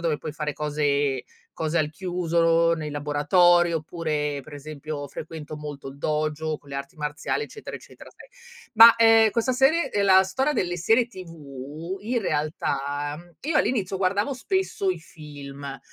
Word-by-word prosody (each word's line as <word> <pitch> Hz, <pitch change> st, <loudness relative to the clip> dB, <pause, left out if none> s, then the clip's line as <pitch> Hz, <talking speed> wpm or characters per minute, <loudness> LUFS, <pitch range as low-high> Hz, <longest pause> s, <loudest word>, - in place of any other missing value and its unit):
dove 160 Hz, -3 st, 0 dB
puoi 155 Hz, -, -6 dB
fare 150 Hz, -1 st, -3 dB
cose 145 Hz, -3 st, 0 dB, 0.3 s
cose 160 Hz, +1 st, -2 dB
al 150 Hz, -2 st, +1 dB
chiuso, 170 Hz, -2 st, +1 dB
nei 155 Hz, -2 st, -3 dB
laboratori, 165 Hz, +4 st, +3 dB
oppure 150 Hz, -3 st, -2 dB
per 150 Hz, +2 st, -12 dB
esempio 145 Hz, 0 st, -6 dB
frequento 155 Hz, 0 st, -8 dB
molto 145 Hz, -2 st, -7 dB
il 135 Hz, +1 st, -11 dB
dojo 155 Hz, +1 st, -1 dB
con 145 Hz, -1 st, -18 dB
le -, -, -6 dB
arti 140 Hz, +5 st, -7 dB
marziali, 150 Hz, -, -2 dB
eccetera, 435 Hz, 0 st, -8 dB
eccetera, -, -, -14 dB
sai. -, -, -16 dB, 0.5 s
Ma, 230 Hz, +1 st, +10 dB
ehm, 225 Hz, -1 st, +6 dB
questa 235 Hz, +4 st, 0 dB
serie 270 Hz, +7 st, +3 dB
ehm, 205 Hz, -1 st, +1 dB
la 190 Hz, 0 st, +7 dB
storia 265 Hz, +10 st, -1 dB
delle 175 Hz, -6 st, -1 dB
serie 225 Hz, +7 st, +3 dB
TV 165 Hz, -, -8 dB
in 235 Hz, +3 st, -1 dB
realtà, 145 Hz, -2 st, -2 dB
mhmm, 175 Hz, 0 st, -16 dB
io 305 Hz, +2 st, 0 dB
all'inizio 195 Hz, -8 st, 0 dB
guardavo 200 Hz, +7 st, +1 dB
spesso 280 Hz, -, -1 dB
i 185 Hz, -2 st, 0 dB
film, 140 Hz, -4 st, -9 dB
160 Hz, 160 wpm, -25 LUFS, 150-190 Hz, 0.5 s, Ma